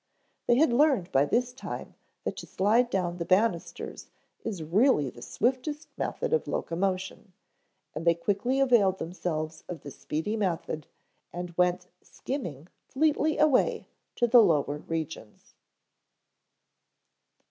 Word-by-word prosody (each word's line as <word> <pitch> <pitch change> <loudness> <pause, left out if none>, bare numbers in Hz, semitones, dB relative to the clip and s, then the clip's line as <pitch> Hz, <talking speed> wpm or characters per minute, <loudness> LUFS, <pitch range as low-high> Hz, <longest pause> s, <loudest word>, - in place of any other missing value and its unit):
They 240 - +5
had 270 -1 +4
learned 260 - +3
by 135 +2 +4
this 245 +10 0
time 260 - -7 0.3
that - - -3
to - - -7
slide 225 +5 +2
down 180 -4 -1
the 170 - -2
banisters 185 0 0 0.4
is 195 -8 -4
really 170 - +3
the 120 - -14
swiftest 265 - -2
method 485 -1 -2
of 470 - +1
locomotion, 185 +2 -2 0.6
and 155 - -5
they 170 0 +4
quickly 205 +9 0
availed 230 -8 +4
themselves 165 -3 -4
of 175 -3 -6
this 145 - -10
speedy 160 +8 -2
method 170 -7 -2 0.4
and 175 -1 -6
went 180 0 +1
skimming 170 - -6 0.2
fleetly 310 +2 +1
away 300 -4 +2 0.3
to 240 - +2
the 240 0 +7
lower 150 -6 +2
regions. 160 -9 -6
190 Hz, 125 wpm, -28 LUFS, 165-250 Hz, 0.6 s, the